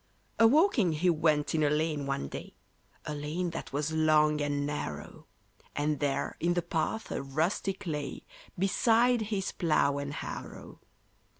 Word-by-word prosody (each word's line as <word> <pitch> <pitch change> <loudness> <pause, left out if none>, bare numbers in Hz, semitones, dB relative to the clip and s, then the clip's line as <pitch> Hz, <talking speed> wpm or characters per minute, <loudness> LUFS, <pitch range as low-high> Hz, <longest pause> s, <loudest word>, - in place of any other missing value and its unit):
A 230 - +8
walking 255 - +4
he 175 +4 +2
went 155 -2 +1
in 160 - +1
a 150 - +3
lane 150 -1 0
one 70 - -2
day,— - - -8 0.5
A 150 - -3
lane 155 +4 -3
that 165 - -6
was 150 +3 -1
long 155 -1 +3
and 145 -1 -1
narrow; 110 - -5 0.5
And 145 0 0
there 145 -2 -1
in 175 +1 +1
the 175 - 0
path 175 +6 -2
a - - -2
rustic 170 +8 -1
lay, 150 -5 -4 0.3
Beside 230 +5 +3
his 195 -3 -1
plough 145 -4 +1
and 140 0 -4
harrow. - - -7
155 Hz, 155 wpm, -30 LUFS, 145-180 Hz, 0.5 s, A